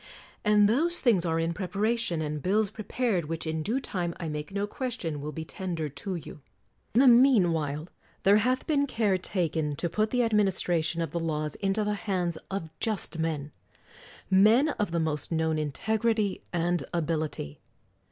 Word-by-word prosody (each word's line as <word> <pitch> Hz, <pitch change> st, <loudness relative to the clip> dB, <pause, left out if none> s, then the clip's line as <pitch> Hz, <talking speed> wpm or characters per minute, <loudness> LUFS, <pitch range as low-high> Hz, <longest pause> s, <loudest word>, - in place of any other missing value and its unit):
And 210 Hz, -1 st, +5 dB
those 325 Hz, +11 st, +1 dB
things 200 Hz, -9 st, +3 dB
are 165 Hz, 0 st, +1 dB
in 165 Hz, +1 st, 0 dB
preparation, 200 Hz, -1 st, -1 dB
and 150 Hz, -1 st, -3 dB
bills 205 Hz, +4 st, +1 dB
prepared, 215 Hz, -4 st, -1 dB
which 165 Hz, +2 st, -4 dB
in 160 Hz, 0 st, -2 dB
due 225 Hz, -, 0 dB
time, 175 Hz, -9 st, -3 dB
I 165 Hz, -3 st, -3 dB
make 150 Hz, +3 st, -5 dB
no 200 Hz, +1 st, -1 dB
question, 205 Hz, -, -4 dB
will 150 Hz, +1 st, -4 dB
be 160 Hz, 0 st, -6 dB
tendered 160 Hz, -6 st, -4 dB
to 190 Hz, +4 st, -4 dB
you. 155 Hz, -2 st, -8 dB, 0.5 s
In 245 Hz, -, +6 dB
the 270 Hz, -, +6 dB
mean 240 Hz, -7 st, +6 dB
while 150 Hz, 0 st, -2 dB, 0.4 s
there 200 Hz, +2 st, +6 dB
hath 255 Hz, +4 st, +1 dB
been 285 Hz, -3 st, +2 dB
care 210 Hz, -7 st, +1 dB
taken 160 Hz, -5 st, -1 dB
to 170 Hz, +3 st, -2 dB
put 215 Hz, +4 st, +1 dB
the 250 Hz, +1 st, +2 dB
ad 225 Hz, -1 st, 0 dB
ministration 175 Hz, -5 st, +1 dB
of 160 Hz, -, -5 dB
the 170 Hz, -, -2 dB
laws 155 Hz, -2 st, -2 dB
into 200 Hz, +2 st, 0 dB
the 210 Hz, 0 st, 0 dB
hands 185 Hz, -5 st, -2 dB
of 180 Hz, -5 st, -4 dB
just 210 Hz, -6 st, -2 dB
men; 155 Hz, -3 st, -2 dB, 0.8 s
men 215 Hz, +10 st, +5 dB
of 210 Hz, -, -1 dB
the 170 Hz, 0 st, -1 dB
most 155 Hz, -2 st, -2 dB
known 160 Hz, -1 st, +1 dB
integrity 215 Hz, +7 st, 0 dB
and 175 Hz, -2 st, 0 dB
ability. 155 Hz, -, -2 dB
180 Hz, 175 wpm, -28 LUFS, 160-215 Hz, 0.8 s, In